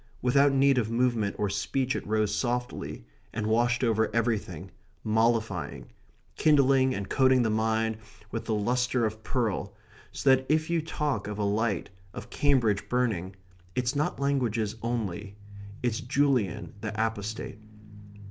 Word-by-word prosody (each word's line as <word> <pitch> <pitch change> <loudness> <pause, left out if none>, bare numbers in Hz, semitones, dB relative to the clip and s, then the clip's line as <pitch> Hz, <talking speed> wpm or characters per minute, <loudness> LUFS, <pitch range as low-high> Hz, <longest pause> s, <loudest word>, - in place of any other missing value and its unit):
Without 140 +3 +4
need 135 -1 +4
of 110 -2 -1
movement 115 -3 +1
or 105 - 0
speech 125 +7 -1
it - - -4
rose 105 -1 +1
softly 125 - -3 0.3
and 110 -1 -3
washed 120 +3 +2
over 110 -2 +2
everything, 115 -2 -1 0.3
mollifying, 110 -3 0 0.5
kindling, 135 -3 +4
and 100 - -4
coating 130 -2 +4
the 110 - +1
mind 110 0 0 0.3
with 115 - -4
the 110 - 0
lustre 125 +3 +1
of 110 0 -4
pearl, 105 -5 -2 0.4
so 135 - +2
that 130 0 0
if 155 +2 +1
you 170 -1 +2
talk 145 -9 -2
of 105 0 -5
a 105 - -1
light, 100 -2 0 0.2
of 120 +4 -8
Cambridge 120 -8 +2
burning, 105 -7 0 0.4
it's 125 +2 0
not 145 0 -1
languages 120 -6 0
only. 105 -4 -3 0.5
It's 120 -1 0
Julian 130 -7 0
the 110 - -3
Apostate. 110 -1 -3
115 Hz, 140 wpm, -28 LUFS, 110-130 Hz, 0.5 s, Without